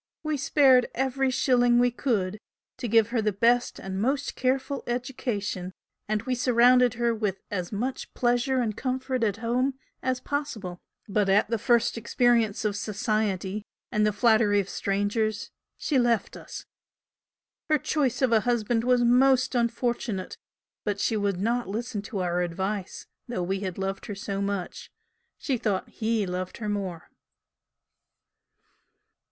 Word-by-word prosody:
We 310 -1 0
spared 265 -3 +4
every 265 +1 +1
shilling 245 -2 +3
we 245 0 +4
could 215 -6 -1 0.4
to 245 - -4
give 225 0 +4
her 235 -1 0
the 210 0 +1
best 235 +4 +2
and 190 0 -4
most 275 +4 0
careful 265 +2 -1
education 235 -7 -3 0.3
and 215 0 -1
we 255 +1 -1
surrounded 250 0 +4
her 235 0 +1
with 210 -4 -2
as 180 -4 -3
much 245 +6 -3
pleasure 245 +2 +1
and 215 -3 -1
comfort 260 0 -2
at 205 -2 +1
home 255 +3 +1 0.3
as 255 -1 -1
possible, 225 -13 -4 0.3
but 205 -1 +1
at 205 +3 +3
the 230 - +1
first 235 0 +2
experience 230 -2 +2
of 205 -1 0
'society,' 210 -1 -1 0.3
and 210 - +2
the 210 - +3
flattery 215 -1 +3
of 195 -1 -2
strangers, 205 +2 -1 0.3
she 280 -4 +1
left 235 -3 +1
us. - - -9 1.0
Her 305 - +5
choice 280 -3 0
of 255 - +3
a 225 - +5
husband 230 0 0
was 250 0 +3
most 255 +2 +4
unfortunate 235 -4 -1 0.5
but 205 -2 -2
she 220 - +1
would 200 -3 0
not 235 +4 0
listen 220 0 -3
to 205 -1 -4
our 175 0 0
advice, 190 +3 -3 0.2
though 235 -7 -2
we 190 +2 -1
had 190 -3 -4
loved 195 0 -3
her 205 - -5
so 195 0 -4
much 200 -2 -4 0.5
she 260 -5 -2
thought 200 -4 -1
'he' 220 -2 -1
loved 180 0 -4
her 215 - -5
more." 190 -5 -4
230 Hz, 150 wpm, -27 LUFS, 200-250 Hz, 1.0 s, Her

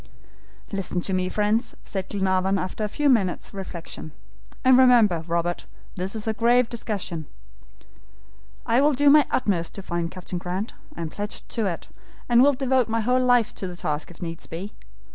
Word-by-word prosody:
"Listen 195 -3 -2
to 190 - -2
me, 185 0 0
friends," 215 +4 0
said 190 -1 -4
Glenarvan 190 -1 +1
after 185 +3 -3
a - - +1
few 295 +7 0
minutes' 205 -10 +1
reflection; 175 -5 -7 0.5
"and 260 0 +7
remember, 235 -10 +5
Robert, 170 +1 -1 0.3
this 190 +3 -3
is 215 - -4
a 220 - +1
grave 240 +2 +3
discussion. 195 -9 -4 1.4
I 235 +3 +3
will 295 +1 +4
do 285 +2 +5
my 300 0 +6
utmost 180 -9 0
to 195 - -6
find 170 -2 -2
Captain 180 0 -5
Grant; 185 +5 -4 0.2
I - - -4
am 160 -2 -4
pledged 205 0 -4
to 225 -3 0
it, 170 -3 -5 0.4
and 240 0 +5
will 285 +2 +6
devote 260 -2 +1
my 225 0 +1
whole 250 +3 +2
life 245 -3 +3
to 190 - -5
the 180 - -7
task 150 -3 -3
if 175 0 -10
needs 165 -1 -6
be. 185 +6 -6
200 Hz, 180 wpm, -24 LUFS, 180-240 Hz, 1.4 s, and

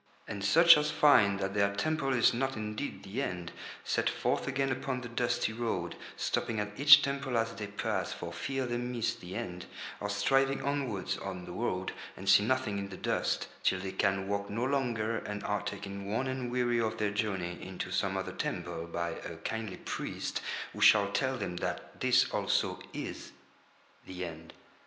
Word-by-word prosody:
And 100 -3 -5
such 165 +10 +8
as 150 0 0
find 100 -9 +5
that 95 0 -2
their 100 -1 +2
temple 140 +5 0
is 125 -1 +4
not 135 +3 -1
indeed 105 +5 -4
the 100 +7 -3
End 90 -8 -3 0.3
set - - +1
forth - - -1
again 135 0 0
upon 130 0 -2
the 120 - -6
dusty 120 -1 0
road, 110 -7 -2 0.2
stopping 110 -2 -1
at 105 0 -2
each 145 +2 +9
temple 140 -3 -1
as 115 0 0
they 105 -2 -5
pass 100 -2 -2
for 85 0 -6
fear 135 +10 -2
they 120 -1 -1
miss 120 -2 -1
the 90 -5 -9
End, 90 0 -5 0.3
or 105 - -3
striving 135 +7 +2
onwards 135 -9 -1
on 95 -2 -5
the - - -8
road, 95 -2 -2 0.3
and 95 - -8
see 100 +1 +7
nothing 115 -4 0
in 100 0 -4
the 95 - -8
dust, - - 0
till 95 - +2
they 95 0 -4
can 95 0 +1
walk 100 0 -2
no 115 +4 -1
longer 120 -5 0
and 105 0 -5
are 105 0 0
taken 100 0 -5
worn 115 +6 0
and 130 -2 -3
weary 120 -1 +2
of 110 0 -1
their 105 -2 0
journey 95 -4 -2
into 90 -1 -5
some 95 0 0
other 95 - -3
temple 85 -1 -3
by 85 0 -2
a - - -7
kindly 110 -4 -3
priest - - -4 0.3
who - - -7
shall 100 -2 +6
tell 130 +5 0
them 90 -6 -4
that - - -4
this - - +5
also - - +1
is - - -6 0.7
the 90 -1 -4
End. 80 -1 -9
105 Hz, 185 wpm, -31 LUFS, 95-125 Hz, 0.7 s, each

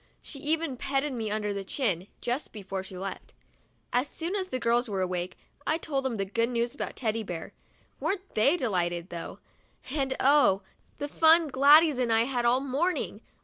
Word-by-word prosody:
She 280 - -7
even 310 -2 0
petted 275 +2 -1
me 225 -3 -3
under 210 -1 -1
the 200 -1 -4
chin, 195 - -1
just 245 +4 -2
before 195 -2 -5
she 190 -1 -10
left. 190 0 -7 0.6
As 250 +3 +2
soon 335 +6 -4
as 380 -2 -1
the 255 - -2
girls 240 0 +1
were 195 -2 -1
awake, 180 0 -3 0.3
I 315 - +2
told 275 -5 -2
them 245 -4 -1
the 195 - -1
good 230 +4 0
news 235 0 0
about - - -5
Teddy 225 -2 -1
Bear. 175 -6 -6 0.5
Weren't 390 -1 -2
they 275 +11 +4
delighted, 175 - -1
though; 170 -1 -6 0.5
and 270 -2 0
oh! 260 -9 +4 0.3
the 290 - -3
fun 320 +1 +5
Gladys 285 +2 +6
and 240 -2 +1
I 225 0 +5
had 245 0 0
all 245 +2 +4
morning 280 +7 -1
245 Hz, 185 wpm, -28 LUFS, 205-290 Hz, 0.6 s, Gladys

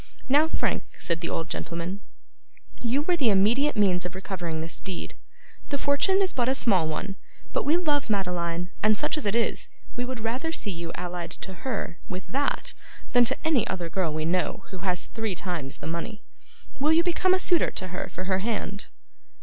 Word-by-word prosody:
'Now, 290 +4 +5
Frank,' - - 0
said 170 -1 -1
the 170 - -2
old 165 - -1
gentleman, 175 +2 -3 0.8
'you 255 +4 +2
were 355 +3 +3
the 275 -9 +3
immediate 225 +9 +4
means 185 -4 +4
of 180 0 -5
recovering 185 -4 -3
this 165 +1 -4
deed. 190 -2 -5 0.6
The 280 - 0
fortune 345 +9 +3
is 375 - -1
but 245 -1 +1
a 265 - +3
small 190 -11 +3
one; 190 +5 -3 0.4
but - - +1
we 305 +4 +4
love 295 -7 +1
Madeline; 175 -3 0
and 215 0 +4
such - - +1
as 305 -9 -1
it 200 - +1
is, 235 - +1 0.3
we 245 - -1
would 250 -1 -3
rather 250 +9 -1
see 210 -10 -1
you 170 -2 -4
allied 175 -1 -4 0.2
to 190 - -7
her 195 -3 -3
with 185 0 -4
that, 280 +2 0 0.4
than 245 -1 +7
to - - +1
any 300 -9 +3
other 175 -3 -3
girl 185 -5 +1
we 155 0 -1
know 180 +2 0
who 190 - -6
has 180 -1 0
three 220 -4 -2
times 170 -7 -3
the - - -9
money. 170 +7 -4 0.6
Will 300 +3 +4
you 330 +1 +5
become 370 +1 +3
a - - 0
suitor 355 -2 +4
to 185 - -3
her 180 +1 -4
for 185 - -5
her 185 0 +1
hand? 205 -1 -2
200 Hz, 200 wpm, -27 LUFS, 180-265 Hz, 0.8 s, than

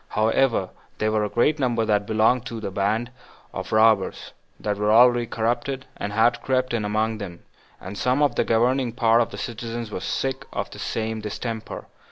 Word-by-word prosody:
However, 110 -2 +1 0.3
there 110 0 0
were 110 -1 +1
a 105 - -1
great 145 +8 +2
number 120 -4 +1
that 105 -1 +1
belonged 110 +3 +2
to 115 - -6
a 105 -3 -5
band 110 +5 -1 0.4
of 95 -1 -6
robbers, 110 -3 +2 0.3
that 105 -1 -2
were 105 +1 +1
already 120 +1 +5
corrupted, 120 +4 -2
and 100 - -4
had 115 +3 +2
crept 130 -1 0
in 115 -2 0
among 110 +1 -1
them, 90 -4 -8 0.4
and 95 +3 -8
some 125 +7 +1
of 140 -4 +3
the - - +1
governing 120 +2 +1
part 115 0 +4
of 115 - 0
the - - -9
citizens 115 -1 -5
were - - -3
sick 135 +7 -2
of - - -3
the - - -10
same 110 0 -3
distemper. 110 +1 -5
115 Hz, 190 wpm, -24 LUFS, 105-120 Hz, 0.4 s, already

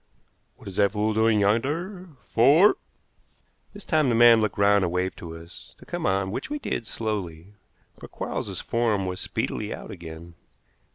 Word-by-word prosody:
"What - - -15
is 95 - -8
that 100 0 +3
fool 105 +1 0
doing 110 0 +3
yonder? 160 - -1 0.2
Fore!" 145 - +5 1.0
This 205 -1 -11
time 155 -4 +2
the 120 - +2
man 115 -1 +7
looked 110 -3 -1
round 100 0 +4
and 85 - -1
waved 90 +1 -1
to 80 -1 -8
us 85 +1 -14
to - - -16
come - - -3
on, 95 0 0
which - - -5
we 295 - -2
did 120 - -4
slowly, 100 -5 -4 0.5
for - - -10
Quarles's - - -5
form 110 -5 0
was 90 0 -4
speedily 105 0 -3
out - - -7
again. 85 -2 -10
105 Hz, 170 wpm, -25 LUFS, 95-120 Hz, 1.0 s, man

